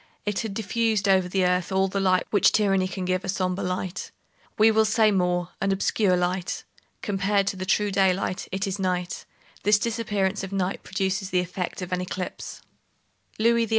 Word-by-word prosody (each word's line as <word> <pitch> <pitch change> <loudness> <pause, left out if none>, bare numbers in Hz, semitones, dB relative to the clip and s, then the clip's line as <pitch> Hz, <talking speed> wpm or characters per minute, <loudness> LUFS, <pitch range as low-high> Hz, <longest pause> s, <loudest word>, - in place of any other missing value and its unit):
It 205 -1 -1
had 220 -4 -4
diffused 220 -2 0
over 190 -2 +3
the 185 0 +1
earth 180 0 +1
all 190 0 +2
the 195 +1 -2
light 185 -1 +2
which 205 - +5
tyranny 195 -3 +2
can 185 0 -5
give—a 185 +1 -1
sombre 185 0 -1
light. 185 +2 -3 0.5
We 220 +1 +6
will 220 0 +4
say 215 0 +3
more; 180 -2 +1
an 195 0 +1
obscure 195 -1 +2
light. 180 0 -2 0.4
Compared 200 0 +1
to - - -4
the 185 0 -5
true 205 +2 +2
daylight, 190 -1 +1
it 190 +2 -1
is 195 0 -3
night. 180 -1 -2 0.4
This 210 +1 +4
disappearance 210 -3 -1
of 195 - -6
night 190 -1 -1
produces 190 0 -2
the 180 - +2
effect 180 +1 -4
of 180 - -7
an 180 0 0
eclipse. 180 0 -6 0.7
Louis 230 +1 +3
XVIII. - - -15
190 Hz, 185 wpm, -25 LUFS, 185-205 Hz, 0.7 s, We